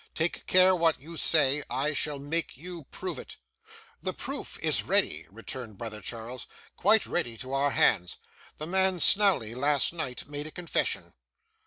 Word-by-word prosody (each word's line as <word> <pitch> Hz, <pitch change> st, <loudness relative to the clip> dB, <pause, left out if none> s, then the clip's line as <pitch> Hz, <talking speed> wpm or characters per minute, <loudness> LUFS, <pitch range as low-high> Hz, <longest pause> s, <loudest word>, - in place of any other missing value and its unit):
Take 165 Hz, +2 st, -2 dB
care 185 Hz, 0 st, +5 dB
what 165 Hz, -2 st, +1 dB
you 165 Hz, +5 st, -11 dB
say; 150 Hz, -3 st, +2 dB
I 145 Hz, +3 st, -1 dB
shall 150 Hz, 0 st, 0 dB
make 145 Hz, +1 st, -3 dB
you 170 Hz, 0 st, -7 dB
prove 175 Hz, -1 st, -6 dB
it.' -, -, -11 dB, 0.6 s
'The -, -, -3 dB
proof -, -, -5 dB
is -, -, +3 dB
ready,' -, -, +1 dB
returned 115 Hz, 0 st, -7 dB
brother 110 Hz, -1 st, -7 dB
Charles, 115 Hz, +4 st, -6 dB, 0.3 s
'quite 215 Hz, +2 st, +3 dB
ready 120 Hz, -10 st, -3 dB
to 130 Hz, +4 st, -8 dB
our 140 Hz, +1 st, +1 dB
hands. 90 Hz, -9 st, +2 dB, 0.4 s
The 155 Hz, -, -5 dB
man 190 Hz, +1 st, +1 dB
Snawley, 195 Hz, -, +6 dB
last 140 Hz, +4 st, +2 dB
night, 155 Hz, -7 st, -5 dB
made 145 Hz, +1 st, -5 dB
a -, -, -9 dB
confession. 175 Hz, 0 st, -2 dB
150 Hz, 160 wpm, -27 LUFS, 130-170 Hz, 0.6 s, Snawley